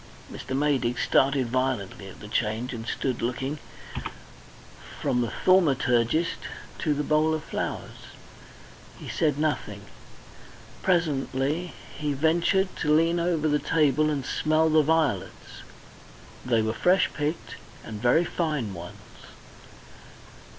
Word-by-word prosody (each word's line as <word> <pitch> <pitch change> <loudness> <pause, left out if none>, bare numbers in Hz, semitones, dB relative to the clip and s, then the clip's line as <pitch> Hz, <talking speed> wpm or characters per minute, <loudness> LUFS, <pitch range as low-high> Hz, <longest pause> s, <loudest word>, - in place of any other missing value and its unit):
Mr. 130 - -4
Maydig 135 -4 +1
started 135 -1 +3
violently 125 -6 -2
at 95 - -12
the 105 - -8
change, 110 +4 -1
and 115 -1 -6
stood 130 -3 -2
looking 130 +5 -2 1.4
from 125 - +1
the 115 -3 -2
thaumaturgist 145 -4 +3 0.4
to 150 -3 +1
the 150 - -1
bowl 155 +2 +2
of 155 - -5
flowers. - - -5 0.9
He - - -10
said 150 -3 0
nothing. 145 -9 -2 1.0
Presently 155 -1 0 0.2
he 150 -1 -1
ventured 170 +6 +2
to 150 - 0
lean 165 +2 +3
over 170 -2 +1
the 150 -1 +2
table 155 -1 +2
and 140 -4 -2
smell 155 +2 +2
the 155 0 +6
violets; 155 -2 -1 0.8
they 115 -3 +2
were 110 0 -1
fresh 180 +9 +3
picked 145 -7 -3 0.3
and 105 -2 -7
very 125 +8 +4
fine 150 - -2
ones. 85 -1 -9
145 Hz, 120 wpm, -26 LUFS, 125-160 Hz, 1.4 s, the